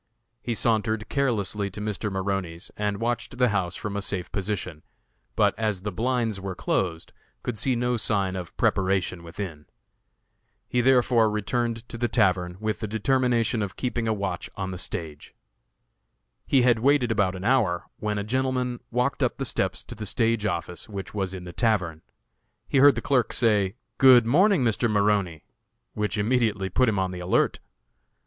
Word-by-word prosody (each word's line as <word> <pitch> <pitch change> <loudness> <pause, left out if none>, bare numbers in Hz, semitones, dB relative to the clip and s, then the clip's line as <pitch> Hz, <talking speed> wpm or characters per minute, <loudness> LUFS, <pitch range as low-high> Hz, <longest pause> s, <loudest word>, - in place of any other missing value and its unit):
He 120 0 -2
sauntered 110 -1 0
carelessly 105 -7 0
to 100 - -8
Mr. 105 0 -3
Maroney's, 95 -3 -3
and 105 -1 -2
watched 120 +2 -2
the 125 -1 +3
house 95 -4 -1
from 105 -1 -5
a 100 - -1
safe 95 -3 -3
position, 95 -5 -3 0.5
but, - - +3
as 105 -4 0
the 105 +2 -3
blinds 115 0 -1
were 95 -1 -4
closed, 85 -3 -2 0.3
could 125 - -3
see 130 +4 +1
no 125 +1 0
signs 100 -4 0
of 90 -3 -7
preparation 95 -2 +1
within. 85 -3 -7 1.0
He 125 - +1
therefore 120 -3 +4
returned 115 +2 -2
to 115 - -8
the 120 - +1
tavern, 90 -6 +1
with 110 -3 -2
the 110 - -3
determination 120 +1 +1
of 100 -2 -3
keeping 120 -2 -2
a - - +2
watch 100 -4 -3
on 95 -1 -4
the 90 - -5
stage. 75 -5 -5 1.1
He 135 -3 +4
had 120 -2 +4
waited 130 -1 +3
about 100 -4 +1
an 95 - -7
hour, 105 -7 +2
when 105 -1 -2
a 100 - -1
gentleman 125 +1 -1
walked 125 +3 0
up - - +1
the - - -3
steps - - -1
to - - -9
the 110 -1 -5
stage 115 0 +1
office, 85 0 -4
which 100 -3 -6
was 95 -3 -2
in 95 -2 -7
the 90 -1 -9
tavern. 90 -8 0 0.7
He 135 - +2
heard 145 +1 +7
the - - -3
clerk 130 -4 +1
say, 105 -4 +2 0.2
"Good 130 -4 +8
morning, 180 - +4
Mr. 115 0 +1
Maroney," 100 -6 +1 0.5
which 105 0 -2
immediately 105 -3 +1
put 125 +6 +3
him 105 - -1
on 95 -1 0
the 90 - -6
alert. 90 +1 +1
105 Hz, 170 wpm, -25 LUFS, 95-120 Hz, 1.1 s, Good